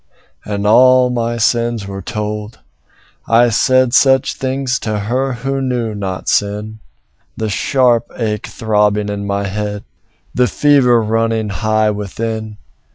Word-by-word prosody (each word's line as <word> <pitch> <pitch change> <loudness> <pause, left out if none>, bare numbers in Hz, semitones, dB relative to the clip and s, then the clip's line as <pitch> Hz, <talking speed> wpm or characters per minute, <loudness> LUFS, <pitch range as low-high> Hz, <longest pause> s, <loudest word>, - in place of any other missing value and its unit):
And 100 -1 -3
all 125 +3 +5
my 120 -1 -2
sins 115 -1 0
were 95 0 -6
told; 105 +1 -5 0.7
I 115 +2 +4
said 130 +2 +2
Such 135 -1 +3
things 130 -1 -2
to 110 -2 -3
her 130 +5 -1
who 135 +3 -3
knew 120 -4 -2
not 95 -3 -5
sin 105 +2 -1 0.6
The 110 -1 -2
sharp 120 +3 +1
ache 105 -3 -2
throbbing 105 -2 0
in 100 0 -4
my 100 0 -1
head, 105 +1 -4 0.5
The 125 0 +2
fever 125 -1 +3
running 115 0 0
high 110 +2 +1
within. 110 +1 -5
110 Hz, 130 wpm, -16 LUFS, 105-125 Hz, 0.7 s, all